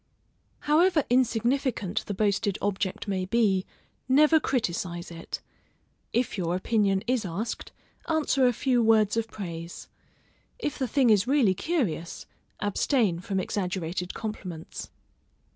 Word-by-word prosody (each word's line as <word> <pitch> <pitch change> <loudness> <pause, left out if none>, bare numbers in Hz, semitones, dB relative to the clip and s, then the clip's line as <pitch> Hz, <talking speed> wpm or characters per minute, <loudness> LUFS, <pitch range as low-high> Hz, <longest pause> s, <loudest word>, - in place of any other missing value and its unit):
However 315 +1 +4
insignificant 240 -4 +1
the 205 - -3
boasted 200 -1 +1
object 195 -1 -2
may 190 -2 -1
be, 195 -3 +2 0.4
never 305 +4 +6
criticise 175 - -2
it; 165 0 -6 0.7
if 235 -4 0
your 175 -1 0
opinion 195 0 +1
is 245 -1 +1
asked, 200 +6 -4 0.4
answer 295 -5 +3
a - - +4
few 250 0 +2
words 220 -2 +4
of 230 -1 0
praise; 170 -5 -7 0.7
if 300 -13 -3
the 260 - 0
thing 250 -1 +3
is 205 +1 +3
really 260 -8 +4
curious, 195 - -2 0.3
abstain 205 - +1
from 190 +2 -2
exaggerated 180 -2 -3
compliments. 185 -7 -6
210 Hz, 120 wpm, -27 LUFS, 185-255 Hz, 0.7 s, never